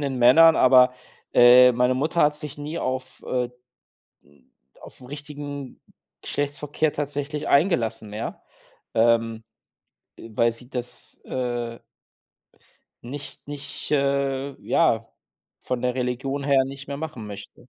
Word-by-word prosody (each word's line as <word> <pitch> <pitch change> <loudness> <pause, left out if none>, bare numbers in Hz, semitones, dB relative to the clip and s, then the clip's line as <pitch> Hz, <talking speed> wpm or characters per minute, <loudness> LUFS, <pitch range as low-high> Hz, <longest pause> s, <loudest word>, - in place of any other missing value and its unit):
den 140 -3 -2
Männern, 155 +7 +7
aber, 125 0 +6 0.4
äh, 125 +1 +8
meine 125 +1 +2
Mutter 155 +6 +1
hat 150 0 +3
sich 150 -1 -7
nie 150 +3 -5
auf, 130 0 -4
äh, 125 -1 -1 0.7
hm 70 -2 -26 0.4
auf - - -14
'n 125 - -12
richtigen 145 -1 -7 0.4
Geschlechtsverkehr 145 +1 -2
tatsächlich 145 +1 -4
eingelassen, 140 - +1
ja, 110 +2 -6 0.5
ähm, 115 0 +2 0.8
äh, 115 - -11
weil 115 +2 +2
sie 125 +2 -5
das, 125 -2 -2
äh 120 -2 -4 1.2
nicht 140 +4 -7
nicht, 140 -1 -6
äh, 140 -1 0
ja 115 -9 +2 0.5
von 125 -1 -4
der 125 0 0
Religion 130 +2 -2
her 135 -2 +3
nicht 135 +1 -8
mehr 140 - -5
machen 145 -7 -6
möchte. 105 +4 -11
130 Hz, 125 wpm, -24 LUFS, 120-145 Hz, 1.2 s, äh